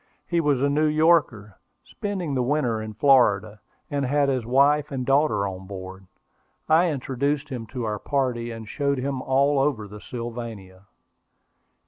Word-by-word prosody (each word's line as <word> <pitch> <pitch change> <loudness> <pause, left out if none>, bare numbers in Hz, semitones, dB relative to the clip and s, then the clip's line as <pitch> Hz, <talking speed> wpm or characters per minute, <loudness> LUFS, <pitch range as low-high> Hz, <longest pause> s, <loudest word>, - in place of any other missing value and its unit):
He 170 -1 0
was 145 -4 +1
a - - +4
New 150 +2 +2
Yorker, 150 - +2 0.2
spending 190 -7 -4
the 130 - 0
winter 125 -4 0
in 110 -1 -7
Florida, 110 -5 +3 0.3
and 140 -1 -1
had 140 +2 +2
his 130 -4 -1
wife 140 +4 +3
and 130 -2 -3
daughter 135 -7 +2
on 95 0 -7
board. 95 -1 -9 0.6
I 165 +3 +4
introduced 140 +1 -2
him 120 -5 -6
to 125 +2 -5
our 105 -2 -2
party, 125 -4 -1
and 115 -1 -8
showed 140 +3 -1
him 135 0 -2
all 135 +2 +2
over 135 -7 0
the 105 +1 -11
Sylvania. 115 -6 -7
130 Hz, 155 wpm, -24 LUFS, 110-145 Hz, 0.6 s, a